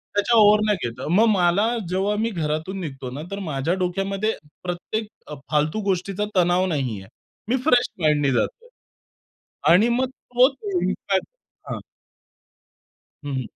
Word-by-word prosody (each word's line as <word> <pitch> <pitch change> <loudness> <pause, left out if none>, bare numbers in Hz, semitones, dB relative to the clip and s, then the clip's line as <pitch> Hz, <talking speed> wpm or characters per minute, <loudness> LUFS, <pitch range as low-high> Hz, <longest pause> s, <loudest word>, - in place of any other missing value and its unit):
त्याच्या 205 +3 +3
ओव्हर 210 0 +7
नाही 200 - 0
घेतं. 125 +5 -7
मग 210 +6 +5
मला 195 +1 +3 0.2
जेव्हा 195 +3 0
मी 225 - +1
घरातून 160 0 -3
निघतो 135 -5 -6
ना 140 +4 -6
तर 200 - -4
माझ्या 140 +5 0
डोक्यामध्ये 195 +4 -1 0.3
प्रत्येक 180 +5 -3 0.2
अ, 150 - -6 0.2
फालतू 155 +8 +1
गोष्टीचा 195 +2 -1
तणाव 180 +1 +3
नाहीये. 125 - -2 0.4
मी 255 - +2
फ्रेश 250 -5 +4
माइंडने 145 -3 +3
जातो 480 - -2 1.0
आणि 205 +7 +5
मग 250 +2 +1
तोच 255 +1 +2 0.3
इंपॅक्ट 190 +1 -1 0.4
हां. - - -3 1.4
हं, 145 -1 -4
हं. 130 -3 -2
185 Hz, 135 wpm, -23 LUFS, 150-215 Hz, 1.4 s, ओव्हर